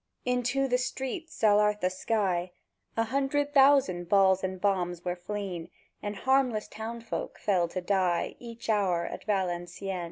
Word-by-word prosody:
Into 250 +2 +1
the 250 -1 +2
streets, 265 +6 -4
ath'art 210 0 +4
the 185 +1 +1
sky, 185 -3 -1 0.4
A 225 - +3
hundred 275 +4 0
thousand 265 - +4
balls 190 -1 +4
and 190 0 -3
bombs 180 -3 0
were 180 0 -1
fleën; 180 -2 -5 0.3
And 205 0 -4
harmless 255 -1 +1
townsfolk 230 +1 -5
fell 185 -4 +1
to 185 +2 -4
die 180 -2 +1
Each 235 -1 -9
hour 190 -6 +2
at - - -7
Valencieën! 185 -1 -2
205 Hz, 140 wpm, -29 LUFS, 180-245 Hz, 0.4 s, ath'art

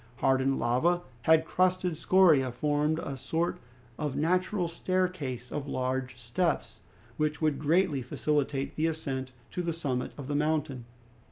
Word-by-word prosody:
Hardened 135 +1 +2
lava 160 +10 +2 0.2
and 160 0 +5
crusted 185 0 +1
scoria 160 -7 +4
formed 150 +4 +1
a 140 -4 -4
sort 165 +6 -1 0.4
of 150 -3 -2
natural 180 +3 +1
staircase 165 -8 -2
of 145 -1 -4
large 130 -1 -2
steps, 120 +1 -1 0.4
which 150 -1 0
would 155 -4 +1
greatly 155 -1 +2
facilitate 140 +1 -1
the 160 +1 +1
ascent 135 -5 -3 0.2
to 180 - -2
the 170 -1 -1
summit 135 -6 -2
of 140 -3 -7
the 145 - -2
mountain. 150 -4 0
150 Hz, 140 wpm, -29 LUFS, 130-170 Hz, 0.4 s, and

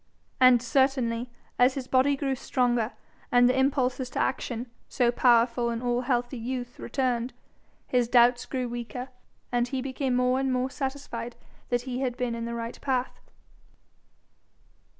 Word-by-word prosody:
And 255 -2 +6
certainly, 250 -2 +1 0.3
as 250 +1 +5
his 265 -2 -5
body 265 +2 +3
grew 270 -1 -1
stronger, 245 -2 0 0.4
and 245 0 +6
the 250 - +2
impulses 265 -1 +1
to - - -4
action, 245 -2 -1 0.2
so 240 -1 +2
powerful 240 -1 +3
in 230 -1 -2
all 245 0 +1
healthy 245 0 -1
youth, 245 +1 -5
returned, 250 -1 -1 0.5
his 245 -2 +1
doubts 240 0 +4
grew 255 -2 -2
weaker, 240 +2 -6 0.4
and 245 0 +1
he 265 +1 -3
became 260 0 -2
more 250 +1 +2
and 270 -1 0
more 255 +1 0
satisfied 265 -4 -5 0.3
that 245 0 0
he 255 -1 -4
had 255 -2 -2
been 245 -2 -1
in 230 0 -4
the 235 0 -4
right 230 0 -6
path. 255 -2 -1
250 Hz, 150 wpm, -27 LUFS, 240-260 Hz, 0.5 s, And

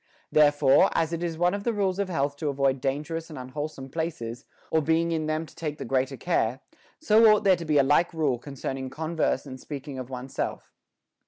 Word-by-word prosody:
Therefore, 145 -2 +5
as 165 0 +1
it 170 - -3
is 170 -2 -2
one 175 +2 +2
of 200 0 -3
the 235 - 0
rules 195 -2 0
of 200 -2 -1
health 145 -4 -1
to 150 0 -2
avoid 135 -1 +1
dangerous 150 +5 -3
and 155 - -8
unwholesome 135 +1 -6
places, 130 -6 -4 0.3
or 160 - +3
being 165 +2 +1
in 160 -2 -1
them 155 +1 -1
to - - -17
take 150 -2 -4
the - - -6
greater 130 +2 0
care, 115 +2 0 0.4
so 225 -6 +5
ought 210 - +3
there 190 -2 +5
to 170 -1 -7
be 155 -2 +2
a 140 - +6
like 150 +5 +3
rule 150 -7 0
concerning 135 0 -5
converse 160 +4 -1
and 130 -2 -8
speaking 140 -1 -7
of 130 -1 -7
one's 130 0 -7
self. - - -4
150 Hz, 215 wpm, -26 LUFS, 135-165 Hz, 0.4 s, a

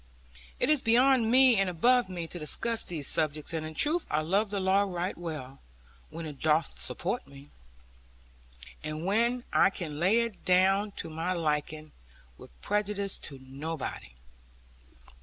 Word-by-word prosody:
It - - +2
is 300 -4 +3
beyond 240 0 +4
me 255 -1 +6
and 195 -1 +2
above 240 +6 +3
me, 175 -2 -4
to 175 +2 -8
discuss 225 +9 -1
these 155 -5 -3
subjects; 155 0 -1
and 160 -1 -2
in 155 0 -7
truth 315 - +1
I 150 - +1
love 195 +7 +1
the 200 0 -2
law 190 +1 +3
right 185 -1 -2
well, 150 -6 -7 0.5
when 165 - -7
it 150 -3 -8
doth 155 0 +1
support 195 - -3
me, 140 +1 -15 1.3
and 155 +2 -4
when 235 +5 +1
I - - +5
can 160 -6 -6
lay 200 +7 +4
it 230 -4 -5
down 190 +3 +3
to 165 - -5
my 165 +4 -2
liking, 155 -2 -2 0.5
with - - -12
prejudice 205 -1 -1
to 140 - -7
nobody. 140 - -6
180 Hz, 155 wpm, -29 LUFS, 155-210 Hz, 1.3 s, me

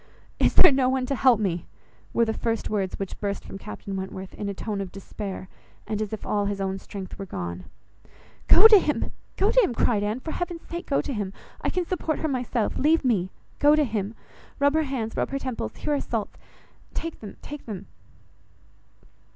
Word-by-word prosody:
"Is - - +3
there - - +9
no 265 -1 +3
one 260 -1 +1
to 275 - -1
help 255 -4 +5
me?" 180 -5 -1 0.4
were 235 - +3
the 220 - 0
first 225 -1 -1
words 195 -3 -1
which 195 -2 -5
burst 200 -1 -2
from 195 - -8
Captain 195 - -6
Wentworth, 190 0 -5
in 205 - -4
a - - -2
tone 205 0 -3
of 190 -2 -5
despair, 195 0 -6 0.4
and 215 0 -2
as 215 - -2
if 220 - -5
all 205 -1 +1
his 200 -1 -2
own 195 0 -1
strength 190 -1 -8
were 195 - -4
gone. 85 - -5 0.8
"Go 445 - +10
to 430 -3 +9
him, 300 - -1 0.3
go 400 +3 +3
to - - +6
him," 255 - +1
cried 215 -3 +2
Anne, 210 +4 -1
"for 315 - -5
heaven's 350 -1 -3
sake 340 +1 -6
go 275 - +2
to 280 - -4
him. 205 -4 -3 0.3
I - - 0
can 360 -1 0
support 325 -3 -1
her 315 - -1
myself. 250 -5 -1
Leave 310 +1 +4
me, 235 -6 +4
and 180 +1 -4 0.3
go 295 +1 +6
to 305 - +4
him. 215 -4 -2 0.4
Rub 285 0 +4
her 315 0 +2
hands, 225 -5 -2
rub - - 0
her 275 - -1
temples; 255 - -4
here 300 - -1
are 285 - +1
salts; 225 -3 -3 0.6
take 330 -1 -4
them, 210 - -9
take 295 -3 -8
them." 200 -3 -5
225 Hz, 210 wpm, -26 LUFS, 195-280 Hz, 0.8 s, Go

